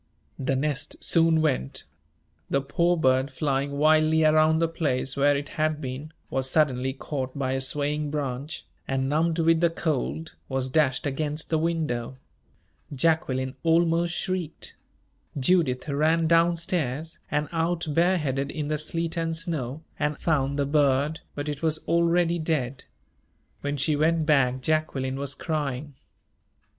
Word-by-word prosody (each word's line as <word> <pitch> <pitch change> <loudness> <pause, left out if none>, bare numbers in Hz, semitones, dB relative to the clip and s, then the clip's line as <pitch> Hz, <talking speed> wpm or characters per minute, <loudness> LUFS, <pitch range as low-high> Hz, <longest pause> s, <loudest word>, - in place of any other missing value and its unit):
The 135 0 0
nest 145 +1 -2
soon 165 -1 +4
went. 130 - 0 0.7
The 140 - +2
poor 170 +6 +1
bird, 130 -3 +2
flying 140 0 -1
wildly 155 +1 +4
around 155 0 +4
the 165 +1 +2
place 140 -5 -1
where 145 0 +3
it 145 +1 -5
had 155 -1 +1
been, 135 +3 -6 0.2
was 130 0 0
suddenly 130 -3 +2
caught 135 -1 -5
by 130 -2 -1
a 135 0 0
swaying 145 +2 -1
branch, 145 0 -4 0.2
and, 135 0 0
numbed 160 +3 +1
with 165 0 +3
the 170 - +4
cold, 160 0 -2 0.2
was 130 -1 -1
dashed 140 -4 +2
against 150 +3 -2
the 160 - +2
window. 150 -7 -2 0.7
Jacqueline 130 -3 +1
almost 170 +1 +2
shrieked. 185 -4 -3 0.6
Judith 135 -3 +2
ran 155 +3 +2
down 170 +1 +4
stairs, 160 -2 -2
and 150 0 0
out 165 +1 0
bareheaded 150 -4 +1
in 150 -1 -4
the 155 -1 0
sleet 165 +2 -2
and 165 -1 -1
snow, 160 -4 -3 0.2
and 150 0 0
found 140 -3 0
the 140 - +1
bird 145 +1 +2 0.2
but 145 +1 -4
it 145 -1 -4
was 160 -1 +1
already 170 0 +2
dead. 140 -5 -2 0.8
When 145 0 -2
she 150 +2 +1
went 160 +2 +2
back, 130 -4 +3
Jacqueline 135 -3 -1
was 140 0 -2
crying. 145 -3 -3
150 Hz, 145 wpm, -26 LUFS, 135-165 Hz, 0.8 s, soon